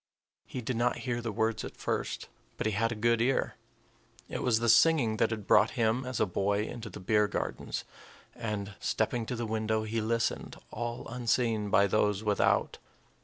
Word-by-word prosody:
He 125 - -5
did 120 +1 -2
not 120 +1 +2
hear 120 -2 -1
the 115 -1 -3
words 110 +1 0
at - - -8
first, - - -3 0.3
but - - -3
he 110 - +2
had 115 +3 +1
a - - -2
good 115 +1 +2
ear, 130 +2 +1 0.8
it - - -4
was 120 -3 +3
the 120 - 0
singing 120 -2 +5
that - - +3
had 110 -3 -4
brought - - +5
him, 115 +2 +1
as 130 -2 -3
a - - +4
boy, 100 +2 0
into 115 -1 -7
the 100 - -9
beer 105 +2 +2
gardens, 105 - -3 0.5
and, 105 -3 -4
stepping 115 -2 -1
to 125 - -2
the 120 0 -3
window, 110 0 0
he 110 +1 -2
listened, 115 +1 -1 0.2
all 120 0 -4
unseen 115 -3 0
by 100 0 +5
those 105 0 +1
without. 105 -2 +1
110 Hz, 185 wpm, -30 LUFS, 105-120 Hz, 0.8 s, singing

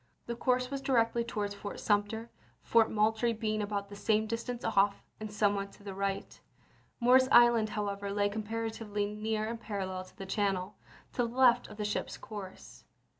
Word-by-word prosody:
The 235 - -4
course 250 +1 +1
was 275 -1 -3
directly 235 -3 +2
towards 210 -3 -3
Fort 200 0 -7
Sumter, 215 +2 0 0.3
Fort 230 -1 +4
Moultrie 220 +2 +2
being 215 -1 -1
about 205 -1 -2
the 200 - -9
same 215 +1 +1
dis 230 +1 -3
tance 245 -1 -5
off 200 -2 +2 0.2
and 215 -1 -6
somewhat 200 -1 +1
to - - -17
the 200 -1 -6
right. 195 0 -3 0.6
Morris 255 +1 +6
Island, 240 -2 +6
however, 200 -1 -2
lay 205 0 +2
comparatively 220 0 -3
near 215 +1 -2
and 230 0 -5
parallel 190 -4 -4
to - - -20
the 195 - -6
channel, 195 -1 -1 0.4
to 245 -2 +1
the 235 - -9
left 245 -2 +5
of - - -11
the 210 - -2
ship's 205 - -2
course. 200 -4 -9
215 Hz, 175 wpm, -31 LUFS, 205-230 Hz, 0.6 s, Morris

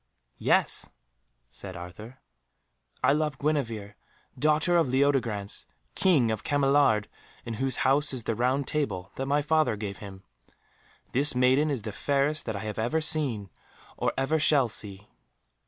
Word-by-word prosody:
"Yes," - - +1 0.6
said 95 -3 -9
Arthur, 105 +9 -10 0.8
"I 135 +2 +5
love 150 -2 -1
Guenevere, 115 -9 -2 0.4
daughter 155 +3 +2
of 165 -4 +3
Leodegrance, 125 -7 0 0.3
King 145 -12 +3
of 110 - -3
Cameliard, 140 -6 +3 0.4
in 115 - -4
whose 135 -1 0
house 145 +3 +3
is 130 -4 -4
the 115 - -1
Round 125 +4 0
Table 100 -12 -2
that 135 - -3
my 145 +1 +1
father 155 -5 +2
gave 100 -2 -6
him. 95 -2 -10 0.9
This 140 +2 +2
maiden 130 +4 +3
is 135 -7 -2
the 110 - -4
fairest 140 +6 -1
that 110 - -2
I 100 - -4
have 110 0 -5
ever 120 +8 0
seen, 130 - +1 0.4
or - - 0
ever 145 +4 +1
shall 145 -5 +4
see." 105 -1 -4
130 Hz, 145 wpm, -27 LUFS, 110-145 Hz, 0.9 s, I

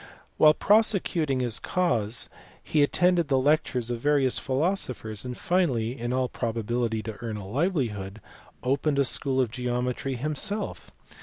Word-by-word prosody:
While 155 0 +6
prosecuting 180 -10 +2
his 120 -3 +1
cause 120 - 0 0.4
he 150 - +1
attended 175 +3 +3
the 135 -2 +2
lectures 130 -4 +1
of 120 - -3
various 140 -1 +2
philosophers, 130 - -2
and 125 -1 -6
finally 130 -11 0
(in 120 -2 -4
all 130 0 +1
probability 115 -1 -2
to 110 -1 -6
earn 115 -3 -4
a 100 - -7
livelihood) 110 - -1 0.4
opened 140 +3 +1
a 140 - +3
school 130 +1 0
of 125 -4 +1
geometry 125 +2 -2
himself. 155 - -3
130 Hz, 140 wpm, -26 LUFS, 115-150 Hz, 0.4 s, While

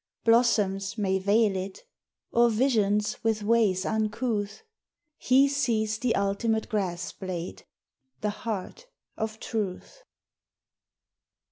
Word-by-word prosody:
Blossoms 210 -4 +2
may 190 -2 +1
veil 205 +1 +3
it 190 +1 -5 0.5
or 235 0 +4
visions 215 -3 +1
with 220 -2 0
ways 210 -4 +2
uncouth, 215 - -1 0.6
He 265 +2 +4
sees 225 -6 0
the 240 -2 +1
ultimate 210 +3 0
grass 185 -5 -2
blade, 185 -3 -6 0.5
the 210 - 0
heart 220 - -5 0.3
of 220 0 -4
Truth. 220 - -4
215 Hz, 100 wpm, -27 LUFS, 195-230 Hz, 0.6 s, or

